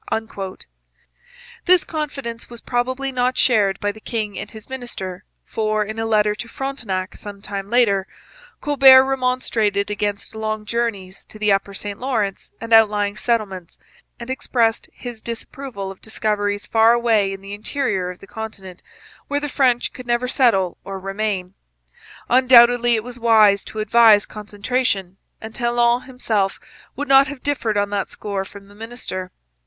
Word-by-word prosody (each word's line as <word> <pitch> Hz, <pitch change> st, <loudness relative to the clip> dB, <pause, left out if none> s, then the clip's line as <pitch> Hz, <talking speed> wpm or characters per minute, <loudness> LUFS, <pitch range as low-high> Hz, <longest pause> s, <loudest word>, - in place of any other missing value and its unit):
This 365 Hz, -1 st, +5 dB
confidence 275 Hz, -7 st, -5 dB
was 235 Hz, -1 st, -10 dB
probably 255 Hz, +3 st, -2 dB
not 250 Hz, 0 st, 0 dB
shared 205 Hz, -5 st, +3 dB
by 205 Hz, -, -1 dB
the 220 Hz, -, -14 dB
king 215 Hz, -3 st, -3 dB
and -, -, -6 dB
his 220 Hz, -2 st, -12 dB
minister, 235 Hz, -8 st, -6 dB, 0.2 s
for, 215 Hz, -1 st, -1 dB
in 220 Hz, +2 st, -6 dB
a 225 Hz, -, -1 dB
letter 210 Hz, -1 st, +3 dB
to 225 Hz, +3 st, -7 dB
Frontenac 225 Hz, -10 st, -4 dB
some 205 Hz, -1 st, -9 dB
time 200 Hz, 0 st, -6 dB
later, 205 Hz, -5 st, +2 dB, 0.5 s
Colbert 270 Hz, -3 st, +7 dB
remonstrated 250 Hz, -6 st, 0 dB
against 205 Hz, 0 st, -3 dB
long 215 Hz, -1 st, -3 dB
journeys 210 Hz, -5 st, -3 dB
to -, -, -12 dB
the 210 Hz, -1 st, +1 dB
upper 195 Hz, 0 st, 0 dB
St 205 Hz, 0 st, -5 dB
Lawrence 225 Hz, -7 st, -2 dB
and 230 Hz, 0 st, -3 dB
outlying 210 Hz, -2 st, +4 dB
settlements, 200 Hz, -7 st, -2 dB, 0.4 s
and 235 Hz, +2 st, -6 dB
expressed 235 Hz, -3 st, 0 dB
his 240 Hz, -3 st, -9 dB
disapproval 230 Hz, -3 st, -6 dB
of 195 Hz, -, -14 dB
discoveries 205 Hz, -2 st, -2 dB
far 225 Hz, +1 st, +4 dB
away 225 Hz, -4 st, +2 dB
in 195 Hz, 0 st, -7 dB
the 195 Hz, +1 st, -8 dB
interior 210 Hz, -4 st, -2 dB
of 180 Hz, -, -8 dB
the -, -, -14 dB
continent 195 Hz, -4 st, -8 dB, 0.5 s
where 285 Hz, -, 0 dB
the 295 Hz, -, -3 dB
French 255 Hz, -4 st, +1 dB
could 250 Hz, -1 st, -10 dB
never 240 Hz, +1 st, +1 dB
settle 225 Hz, -9 st, +2 dB
or 195 Hz, 0 st, -6 dB
remain. 195 Hz, -1 st, -3 dB, 0.7 s
Undoubtedly 240 Hz, -1 st, +6 dB
it 220 Hz, -, -2 dB
was 245 Hz, 0 st, -9 dB
wise 215 Hz, -4 st, +5 dB
to -, -, -10 dB
advise 215 Hz, 0 st, +5 dB
concentration, 205 Hz, -2 st, -2 dB, 0.2 s
and 220 Hz, 0 st, -9 dB
Talon 240 Hz, +1 st, +1 dB
himself 220 Hz, -7 st, -1 dB, 0.4 s
would 290 Hz, -, -4 dB
not 270 Hz, 0 st, +6 dB
have 275 Hz, -2 st, -8 dB
differed 230 Hz, -7 st, -1 dB
on 205 Hz, 0 st, 0 dB
that 200 Hz, -1 st, -2 dB
score 200 Hz, -2 st, -4 dB
from 200 Hz, 0 st, -13 dB
the 200 Hz, -, -17 dB
minister. 220 Hz, -4 st, -6 dB
220 Hz, 155 wpm, -21 LUFS, 200-245 Hz, 0.7 s, Colbert